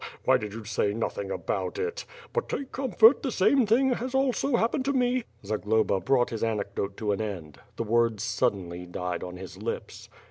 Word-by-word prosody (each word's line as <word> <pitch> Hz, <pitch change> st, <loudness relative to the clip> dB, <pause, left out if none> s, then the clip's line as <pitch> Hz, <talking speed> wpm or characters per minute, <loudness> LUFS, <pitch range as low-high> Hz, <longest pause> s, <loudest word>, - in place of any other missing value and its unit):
Why -, -, +5 dB
did 105 Hz, -1 st, -5 dB
you 115 Hz, -, -6 dB
say 105 Hz, -1 st, 0 dB
nothing 100 Hz, -3 st, -3 dB
about -, -, -2 dB
it? 450 Hz, +3 st, -3 dB, 0.3 s
But 485 Hz, -, -1 dB
take 270 Hz, -1 st, -4 dB
comfort, 255 Hz, -2 st, +5 dB
the 270 Hz, -, -1 dB
same 235 Hz, +5 st, +3 dB
thing 255 Hz, +5 st, +4 dB
has 250 Hz, +2 st, -4 dB
also 270 Hz, 0 st, +2 dB
happened 235 Hz, +4 st, +1 dB
to 280 Hz, -, +1 dB
me 250 Hz, -2 st, +1 dB
" -, -, -23 dB
Zagloba 110 Hz, -1 st, +1 dB
brought 125 Hz, +2 st, +2 dB
his 115 Hz, -1 st, -3 dB
anecdote 100 Hz, -2 st, -2 dB
to 105 Hz, -2 st, -1 dB
an 100 Hz, -, -1 dB
end. 85 Hz, -9 st, -6 dB, 0.2 s
The -, -, -2 dB
words 115 Hz, -1 st, +1 dB
sud 110 Hz, -3 st, +1 dB
denly 90 Hz, -1 st, -8 dB
died 90 Hz, 0 st, -3 dB
on 90 Hz, 0 st, -7 dB
his 95 Hz, 0 st, -9 dB
lips. -, -, -5 dB
115 Hz, 200 wpm, -27 LUFS, -, 0.3 s, Why